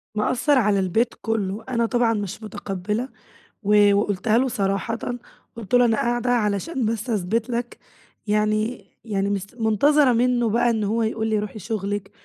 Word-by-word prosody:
مأثرعلى 220 -2 +2
البيت 220 +6 +1
كله، 215 -2 -2
أنا 235 -2 +1
طبعًا 240 -1 +2
مش 205 0 -4
متقبلة، 210 +4 -4 0.5
و 205 0 +5
وقُلتها 205 +2 +1
له 260 +1 +2
صراحةً، 195 0 -1 0.6
قُلت 230 +1 -9
له 245 0 +6
أنا 225 -2 +2
قاعدة 240 +1 0
علشان 225 - 0
بس 225 +2 -2
أثبت 225 +3 -1
لَك، 240 0 -4 0.5
يعني 215 +3 0 0.2
يعني 200 -3 -1
مس 200 -1 -2
منتظرة 250 +5 +3
منه 240 -1 +2
بقى 240 +2 +2
إن 220 -2 0
هو 225 +3 0
يقول 220 0 -1
لي 215 -1 +1
روحي 210 +1 -6
شغلِك، 205 -1 -4
220 Hz, 150 wpm, -23 LUFS, 205-240 Hz, 0.6 s, له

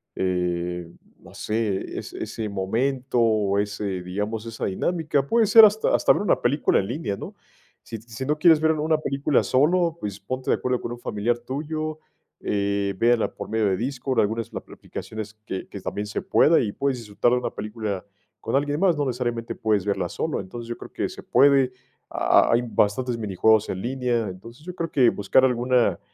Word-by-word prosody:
eh, 90 -1 -2 0.3
no - - -16
sé, 105 -3 -2
ese - - -7
ese 110 -2 -5
momento, 125 +7 -1
o 105 -3 +2
ese, 100 -2 -3
digamos, 105 +5 -4
esa 115 -1 -4
dinámica. 155 - 0
Puede 230 +4 +3
ser 225 +2 +9
hasta 215 +1 +2
hasta - - +4
ver - - -2
una 205 - +1
película 140 +5 +2
en 95 - -2
línea, 120 -6 -3
¿no? - - -8 0.5
Si 115 - -7
si 115 +3 -7
no 150 +2 0
quieres 160 -1 +6
ver 160 - +4
una 155 +1 +1
película 140 -2 0
solo, 165 +5 +2
pues, 100 -1 -5
ponte 130 +6 -5
de - - +4
acuerdo 125 -1 -1
con - - -5
un 120 - -9
familiar 120 +2 -1
tuyo. 155 +5 -4 0.4
Eh, 100 -1 -1
véanla 115 +2 +2
por - - -8
medio 110 -1 +1
de 95 - +2
Discord, 130 +3 -2
algunas 110 +2 -1
ap - - -7
aplicaciones 110 -1 -7
que 95 - -5
que 100 - -9
también 105 +2 -4
se 105 - -3
pueda, 165 - +4
y 105 - -1
puedes 135 +2 -1
disfrutar 110 +2 0
de 125 - +3
una 125 - -3
película 105 -3 -5 0.4
con 115 - -2
alguien 145 +2 0
más. 185 -3 +3
No 145 - 0
necesariamente 120 -2 -2
puedes 105 -3 0
verla 100 - -1
solo. - - -2
Entonces, 115 +5 -8
yo 120 - -4
creo - - -11
que - - -2
se - - -10
puede, 135 -2 +4 0.4
ha - - +3
ha - - +3
hay 120 - +4
bastantes 120 +2 0
minijuegos 110 +1 +2
en 95 - -3
línea. 120 -3 -1
Entonces, 115 - -12
yo 180 - -6
creo 165 -2 -3
que 125 -4 +5
buscar 100 +6 +3
alguna 125 -6 +2
115 Hz, 195 wpm, -24 LUFS, 105-135 Hz, 0.5 s, ser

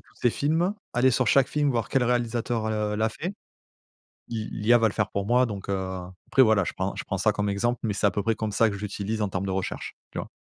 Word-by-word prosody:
tous - - -25
ses 120 - +4
films, 165 - +1 0.2
aller 125 +2 +4
sur 130 0 +1
chaque 135 -1 +4
film 145 0 +1
voir 115 -3 -1
quel 130 -2 +2
réalisateur 120 -2 0
l 110 - -1
heu, 105 -1 -1
l'a 110 +1 +2
fait. 170 - -5 1.0
L'i 110 -2 -4
l'IA 120 +3 +4
va 115 -1 +3
le - - -6
faire 105 -1 0
pour 100 - -2
moi 125 +3 +4
donc, 100 -4 -6
heu, 100 - +1 0.5
après, 135 - +5
voilà, 110 -5 +4
je - - -3
prends 95 +1 -2
je - - -5
prends 95 - -3
ça 105 +3 +3
comme 105 0 -1
exemple 120 +5 0
mais 110 - +1
c'est 100 - +1
à - - +4
peu 100 - -2
près 115 +3 +1
comme 110 0 -3
ça 115 +2 +4
que 100 - -4
je - - -9
l'utilise 105 +1 -3
en 105 - +1
termes 95 0 -3
de - - -2
recherche, 95 -1 -3 0.2
tu - - -5
vois? - - -4
110 Hz, 275 wpm, -26 LUFS, 105-125 Hz, 1.0 s, après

